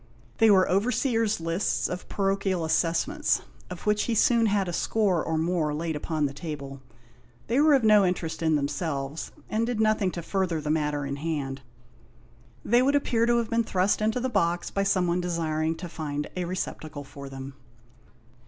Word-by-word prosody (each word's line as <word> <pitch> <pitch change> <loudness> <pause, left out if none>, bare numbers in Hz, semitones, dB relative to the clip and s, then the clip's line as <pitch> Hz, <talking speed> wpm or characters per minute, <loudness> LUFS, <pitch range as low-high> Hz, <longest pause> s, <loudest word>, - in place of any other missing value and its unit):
They 225 -1 +6
were 190 -2 +5
overseers' 225 +1 +1
lists 165 +4 0
of 180 0 -6
parochial 195 -3 0
assessments, 170 - +1 0.3
of - - -8
which 210 0 +2
he 235 - 0
soon 230 +1 +4
had 200 -2 +1
a 175 - -3
score 195 -4 +1
or 160 -1 -1
more 160 -2 0
laid 160 +1 -2
upon 155 0 -1
the 140 - -3
table. 140 -3 -7 0.6
They 245 +5 +2
were 300 -1 +6
of 265 - +2
no 210 -2 +6
interest 180 -3 -2
in 160 -1 +2
them 140 -1 +1
selves, 145 0 -4 0.2
and 220 +1 0
did 240 -3 -2
nothing 215 -3 +2
to 170 - -5
further 185 -3 -1
the 150 0 -2
matter 150 -2 0
in 140 0 -4
hand. 140 -3 -3 1.0
They 240 +2 +4
would 275 +3 +3
appear 235 -5 +2
to 240 0 +3
have 235 -1 -1
been 230 0 +2
thrust 190 0 +1
into 220 +3 +1
the 255 - -1
box 170 -8 0
by 195 - 0
someone 180 -2 +1
desiring 160 -2 -1
to 175 +2 -7
find 150 -3 -4
a 180 -1 -2
receptacle 155 -4 -5
for 140 0 -10
them. 135 0 -8
175 Hz, 180 wpm, -26 LUFS, 155-215 Hz, 1.0 s, They